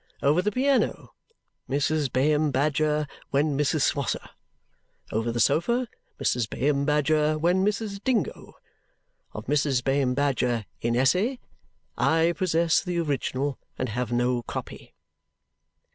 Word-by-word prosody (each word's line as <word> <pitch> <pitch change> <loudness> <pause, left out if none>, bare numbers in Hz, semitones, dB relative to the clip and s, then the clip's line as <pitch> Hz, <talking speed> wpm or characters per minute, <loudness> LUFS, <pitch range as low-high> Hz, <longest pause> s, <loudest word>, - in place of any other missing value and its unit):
Over 150 +5 +4
the 210 - 0
piano, 270 +4 0 0.6
Mrs. 145 0 0
Bayham 150 +3 +2
Badger 150 +2 +1 0.2
when 145 +1 +1
Mrs. 145 +1 +1
Swosser. 140 -1 -1 0.8
Over 115 +2 -1
the 120 - -3
sofa, 235 - +2 0.3
Mrs. 120 -3 0
Bayham 140 +1 0
Badger 150 +1 +2
when 175 +4 +2
Mrs. 205 -1 -2
Dingo. 255 -4 -1 0.8
Of - - -7
Mrs. 140 -3 +1
Bayham 135 -2 +1
Badger 125 -5 0 0.2
IN 115 0 0
ESSE, 185 - +2 0.6
I 165 +1 +3
possess 170 -3 +2
the 180 -2 -3
original 140 -3 -1 0.2
and 130 - -2
have 120 +1 -3
no 120 0 +1
copy." - - -8
150 Hz, 120 wpm, -26 LUFS, 130-170 Hz, 0.8 s, Over